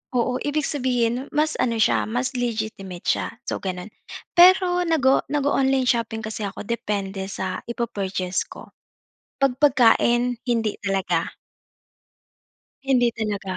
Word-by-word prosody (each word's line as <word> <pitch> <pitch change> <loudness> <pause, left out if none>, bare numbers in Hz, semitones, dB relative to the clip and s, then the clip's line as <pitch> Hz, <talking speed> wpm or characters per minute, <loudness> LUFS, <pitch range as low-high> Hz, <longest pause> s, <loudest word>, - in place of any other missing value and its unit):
Oo, 250 +1 +1
ibig 290 0 0
sabihin, 250 -2 0
mas 305 +1 +1
ano 235 -3 0
siya 220 - +2
mas 245 +3 -2
legitimate 215 -6 -4
siya, - - 0
so, - - -3
gano'n. 185 +2 -5 0.5
Pero 360 0 +6
nag 325 -4 +1
o 265 - +5
nag-o-online 270 -2 +1
shopping 225 -2 -1
kasi 215 0 -5
ako 195 - -7
depende 200 -4 -3
sa 190 -1 -4
i-pu-purchase 195 -6 -2
ko, - - -12 0.7
'pag 275 -2 +2
pagkain 245 -3 +4
hindi 225 -3 0
talaga. 190 -4 0 1.5
Hindi 250 -3 +3
talaga. 200 -4 -3
235 Hz, 125 wpm, -23 LUFS, 200-265 Hz, 1.5 s, Pero